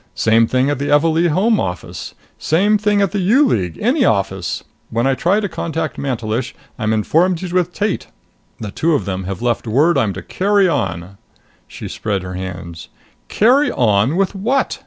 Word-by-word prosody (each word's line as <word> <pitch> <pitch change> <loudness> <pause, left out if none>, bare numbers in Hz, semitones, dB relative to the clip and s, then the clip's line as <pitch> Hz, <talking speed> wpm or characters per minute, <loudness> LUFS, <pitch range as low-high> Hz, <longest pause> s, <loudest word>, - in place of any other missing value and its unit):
Same 115 0 +3
thing 130 +2 +1
at 145 - -2
the 140 - -2
Evalee 160 +3 +3
Home 205 +7 +2
office. 90 -4 -5 0.2
Same 205 +6 +2
thing 205 -1 +2
at 200 - 0
the 205 - -2
U 230 +11 +4
League 90 - -1
any 255 +6 +2
office. 95 - -1 0.3
Then 115 +2 0
I 135 - +3
try 175 - +1
to 210 - -2
contact 165 -3 -4
Mantelish. 120 -2 -3 0.2
I'm 110 -1 0
informed 165 - +1
he's 180 -2 -5
with 180 -1 +1
Tate! 205 +3 -2 0.5
The 105 -3 -6
two 160 +8 +1
of 140 - -1
them 95 -2 -4
have 95 +3 -5
left 120 -1 -1
word 145 +7 +3
I'm 110 -6 0
to 95 - -8
carry 200 0 +2
on." 100 - -3 0.5
She - - -8
spread 100 -3 -3
her 90 0 -6
hands. 90 -3 -7 0.4
"Carry 260 +7 +3
on 110 +4 +2
with 195 +1 +1
what? 235 +8 -1
145 Hz, 180 wpm, -18 LUFS, -, 0.5 s, U